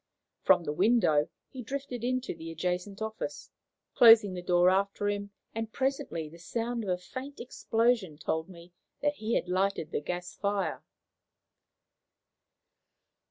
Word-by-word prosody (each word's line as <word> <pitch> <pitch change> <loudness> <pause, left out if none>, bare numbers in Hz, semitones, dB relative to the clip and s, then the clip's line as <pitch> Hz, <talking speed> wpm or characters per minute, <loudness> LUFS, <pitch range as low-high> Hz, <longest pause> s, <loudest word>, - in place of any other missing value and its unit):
From 180 -2 +5
the 150 - -2
window 180 -5 +3 0.2
he 260 - -7
drifted 260 -1 -5
into 255 +1 -1
the 165 0 -8
adjacent 180 +5 -3
office, 220 0 -5 0.4
closing 225 -4 +8
the 180 - -5
door 175 0 +4
after 200 +1 0
him; 200 0 -3 0.2
and 225 0 -4
presently 260 - -2
the 165 +3 -13
sound 230 +6 -3
of 200 - -4
a 180 - +1
faint 260 +10 -8
explosion 230 -8 0
told 160 +2 -2
me 175 -1 -13 0.3
that 290 0 +1
he 220 +2 -1
had - - 0
lighted 185 -2 0
the - - -1
gas 180 +3 -4
fire. 200 -4 -2
200 Hz, 140 wpm, -30 LUFS, 175-230 Hz, 0.4 s, closing